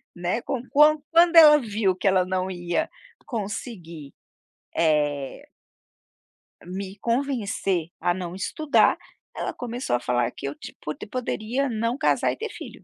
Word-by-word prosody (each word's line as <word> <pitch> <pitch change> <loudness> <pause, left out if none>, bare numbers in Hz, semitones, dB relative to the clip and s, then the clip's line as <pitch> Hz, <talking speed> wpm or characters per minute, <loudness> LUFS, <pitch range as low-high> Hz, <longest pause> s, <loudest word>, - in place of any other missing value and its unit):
Né? 180 +7 -2
Com 250 -1 -3
qua 300 +2 +6
quando 340 +1 +5
ela 300 -2 +9
viu 210 -5 0
que 195 - -2
ela 185 -1 +4
não 185 0 -1
ia 175 - -2 0.4
conseguir, 195 - -6 0.6
eh 145 -4 0 1.2
me 190 +2 -6
convencer 225 - -1
a 175 +1 +1
não 180 -1 -5
estudar, 290 +9 +2 0.4
ela - - -3
começou 245 - -3
a - - 0
falar 120 -1 0
que 140 - -6
eu, 140 - -5
tipo, 150 - -7 0.2
poderia 255 +2 -2
não 230 +3 -1
casar - - +2
e - - -6
ter 455 - -4
filho. - - -10
200 Hz, 140 wpm, -25 LUFS, 175-255 Hz, 1.2 s, ela